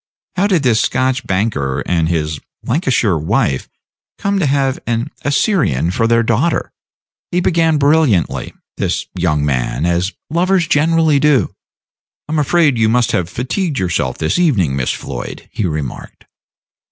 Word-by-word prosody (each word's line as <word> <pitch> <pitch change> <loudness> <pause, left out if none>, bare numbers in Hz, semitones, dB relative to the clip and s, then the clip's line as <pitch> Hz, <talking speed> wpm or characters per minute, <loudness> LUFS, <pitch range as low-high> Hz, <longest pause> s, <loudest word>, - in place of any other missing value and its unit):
"How 190 +2 +2
did 180 -7 +1
this 115 -4 +3
Scotch 130 +3 0
banker 95 -10 -1
and 80 -2 +1
his 80 -3 -1 0.2
Lancashire 120 - +1
wife 70 -3 0 0.5
come 200 0 0
to 165 - +1
have 135 -1 +1
an 120 0 -1
Assyrian 140 - +1
for 115 +4 +1
their 115 0 +3
daughter?" 120 +9 0 0.6
He 180 - 0
began 165 -3 +2
brilliantly, 145 - +1 0.2
this - - -1
young 75 -5 0
man, 65 +2 -1
as 85 +2 0 0.2
lovers 180 +2 +2
generally 160 -1 +3
do. 145 -3 +2 0.7
"I 155 - -4
am 155 - +1
afraid 150 -3 +2
you 110 -1 +3
must 120 +1 +2
have 90 -2 -1
fatigued 140 - -2
yourself 85 - -1
this 80 - 0
evening, 100 - +2
Miss 65 -2 0
Floyd," - - -7
he 105 - -1
remarked. 75 -5 -6
120 Hz, 145 wpm, -16 LUFS, -, 0.7 s, this